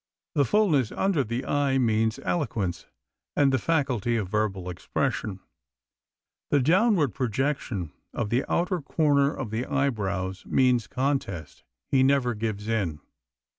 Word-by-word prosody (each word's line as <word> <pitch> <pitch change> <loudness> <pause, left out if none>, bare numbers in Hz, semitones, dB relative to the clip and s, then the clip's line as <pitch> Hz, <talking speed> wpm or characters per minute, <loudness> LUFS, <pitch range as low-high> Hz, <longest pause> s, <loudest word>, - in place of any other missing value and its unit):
The 140 - +3
fullness 155 - +2
under 190 -8 +1
the 120 +3 -3
eye 140 -2 +1
means 110 -3 +1
eloquence 105 - -2 0.5
and 140 -2 +3
the 130 - +3
faculty 130 -7 0
of 100 -5 -2
verbal 100 -3 -1
expression. 95 +2 -2 1.1
The 145 - +4
downward 170 - +3
projection 120 - -2 0.2
of 110 -3 -3
the 125 +3 +2
outer 180 0 +1
corner 145 -1 +2
of 125 -8 -5
the 115 +3 -2
eyebrows 100 -9 -1
means 125 -3 +3
contest 130 - -2 0.3
he 135 - +4
never 130 -2 +3
gives 105 -1 -3
in. 95 -9 -1
125 Hz, 130 wpm, -26 LUFS, 105-140 Hz, 1.1 s, The